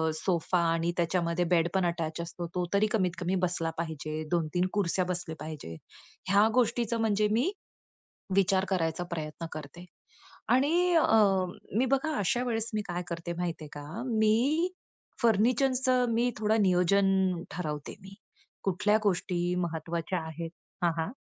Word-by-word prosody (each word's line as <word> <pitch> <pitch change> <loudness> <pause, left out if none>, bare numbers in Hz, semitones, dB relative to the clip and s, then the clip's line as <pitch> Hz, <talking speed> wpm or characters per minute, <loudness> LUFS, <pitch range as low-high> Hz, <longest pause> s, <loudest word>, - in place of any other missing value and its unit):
Sofa, 175 +1 0
आणि 165 +1 0
त्याच्यामध्ये 170 0 +1
बेडपण 170 +2 +1
attach 170 -1 -3
असतो, 170 0 -6
तो 180 -1 0
तरी 210 +2 +4
कमीतकमी 185 -3 0
बसला 165 -2 -1
पाहिजे. 155 -1 -4
2-3 175 +2 +1
खुर्च्या 185 -2 +1
बसल्या 175 -3 -3
पाहिजेत. 150 - -7 0.5
ह्या 205 +2 +5
गोष्टीचं 235 -1 +1
म्हणजे 210 -1 +2
मी 255 - +2 0.8
विचार 195 0 +3
करायचा 170 -2 0
प्रयत्न 155 0 -4
करते. 155 +3 -9 0.6
आणि 330 +8 +3
अ, 325 - +5 0.7
मी 260 - +3
बघा, 300 +3 +1
अशा 240 +6 +1
वेळेस 225 -1 -1
मी 210 - +1
काय 175 0 -3
करते, 170 0 -4
माहिती 170 -3 -3
आहे - - -11
का, 160 +12 -6
मी 240 +10 +2 0.5
फर्निचरचं 250 +3 +3
मी 240 +2 +2
थोडं 215 0 +2
नियोजन 190 +2 +3 0.4
ठरवते 150 -3 -4
मी. 195 +1 -12 0.5
कुठल्या 200 +3 +2
गोष्टी 180 -2 0
महत्त्वाच्या 170 +1 -2
आहेत? 165 +1 -6 0.3
हां, 170 - +4
हां. 165 +7 -2
180 Hz, 135 wpm, -29 LUFS, 170-220 Hz, 0.8 s, ह्या